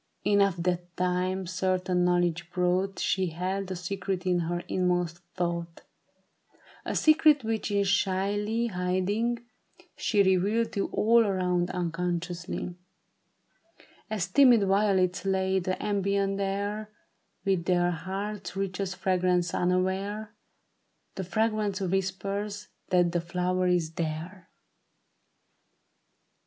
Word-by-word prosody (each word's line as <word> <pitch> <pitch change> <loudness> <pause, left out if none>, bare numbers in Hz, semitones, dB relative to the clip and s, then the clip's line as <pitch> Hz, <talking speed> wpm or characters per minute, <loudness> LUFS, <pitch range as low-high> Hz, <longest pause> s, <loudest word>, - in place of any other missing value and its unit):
Enough 200 -3 +3
that 175 -1 -2
time 180 +1 0
the - - -8
certain 185 0 0
knowledge 175 -1 +1
brought 180 +2 0
She 190 -1 +1
held 185 +4 -3
a 185 - -3
secret 185 +1 -3
in 180 -1 +2
her 175 +1 -2
inmost 180 -2 0 0.2
thought; 170 -1 -3 1.0
A - - -3
secret 310 -3 +5
which 220 -1 -2
in 200 -1 +2
shyly 205 +3 +1
hiding, 205 +5 -1 0.5
she 205 -2 +2
Revealed 200 +5 +2
to 200 - -1
all 230 +2 +4
around 180 -3 0
unconsciously; 175 0 -3 1.4
As 210 -5 -1
timid 240 +1 +6
violets 195 -2 +2
lade 190 -1 +1
the 185 - -1
ambient 200 -1 0
air 200 +2 -2 0.6
With 190 -3 +1
their 175 -1 +2
heart's 195 +4 -5
richest 195 -1 -2
fragrance, 180 -2 +1
unaware 190 +4 -1 0.8
The 190 - -4
fragrance 215 +1 0
whispers 195 +2 -2 0.2
that 175 -2 +3
the 175 0 0
flower 180 +1 0
is 175 -3 +1
there. 165 +4 -5
185 Hz, 110 wpm, -28 LUFS, 180-200 Hz, 1.4 s, timid